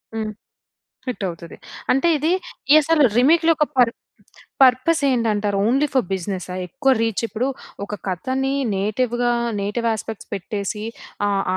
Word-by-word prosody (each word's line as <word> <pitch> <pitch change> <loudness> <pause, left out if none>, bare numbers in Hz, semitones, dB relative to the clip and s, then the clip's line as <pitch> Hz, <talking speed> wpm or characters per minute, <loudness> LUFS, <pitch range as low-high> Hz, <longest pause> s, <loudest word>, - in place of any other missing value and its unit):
హ్మ్. 215 -1 -2 0.8
హిట్ 245 -5 -3
అవుతది. 170 -1 -9 0.4
అంటే, 270 +6 +2
ఇది 310 +4 +1 0.4
ఈ - - +9
అసలు 320 0 +3
రీమేక్‌లో 325 +6 +5
ఒక 300 - +3
పర్ 245 -2 +5 0.7
పర్పస్ 260 +6 +4
ఏంటంటారు? 210 -5 +1
Only 270 +6 +2
for 260 -6 +2
బిజినెసా? 185 -1 -4
ఎక్కువ 270 +6 +1
రీచ్ 225 -3 0
ఇప్పుడు, 225 +5 -2 0.4
ఒక 205 +1 -4
కథని 260 +9 -1 0.2
నేటివ్‌గా, 240 +4 0 0.3
నేటివ్ 230 +4 -1
యాస్పెక్ట్స్ 220 -1 -5
పెట్టేసి 200 +2 -4 0.4
ఆహ్, 200 -1 +1
230 Hz, 130 wpm, -21 LUFS, 205-265 Hz, 0.8 s, ఈ